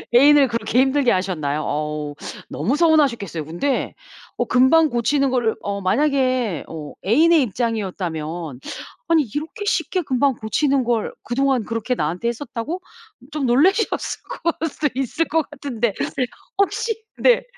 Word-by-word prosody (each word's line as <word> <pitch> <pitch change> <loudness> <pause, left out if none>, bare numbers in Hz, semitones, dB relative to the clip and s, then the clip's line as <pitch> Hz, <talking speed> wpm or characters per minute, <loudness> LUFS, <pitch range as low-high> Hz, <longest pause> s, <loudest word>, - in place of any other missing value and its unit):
애인을 285 +2 +7
그렇게 235 0 0
힘들게 265 -1 +3
하셨나요? 155 -6 -1
어우 150 0 -3 0.4
너무 205 - -1
서운하셨겠어요. 270 - +2
근데 175 - -1 0.4
어 - - +1
금방 305 +6 +5
고치는 275 +3 +1
거를 235 -4 +1
어 200 0 -3
만약에 255 - +1
어 155 -3 -7
애인의 315 - +5
입장이었다면 175 - -3 0.5
'아니 325 -2 +5
이렇게 325 +9 -4
쉽게 375 -2 0
금방 270 -1 +1
고치는 265 +5 +1
걸 235 -2 0
그동안 260 -2 +1
그렇게 230 +2 -2
나한테 175 +5 -2
했었다고?' 250 +7 -5 0.5
좀 300 -3 -2
놀라셨을 330 - +2 0.2
걸 325 -1 0
수도 295 +1 -1
있을 270 +5 -1
것 320 -2 0
같은데 240 -6 -2 0.6
혹시 440 +3 0
네. - - +4
250 Hz, 310 characters per minute, -21 LUFS, 200-295 Hz, 0.6 s, 애인을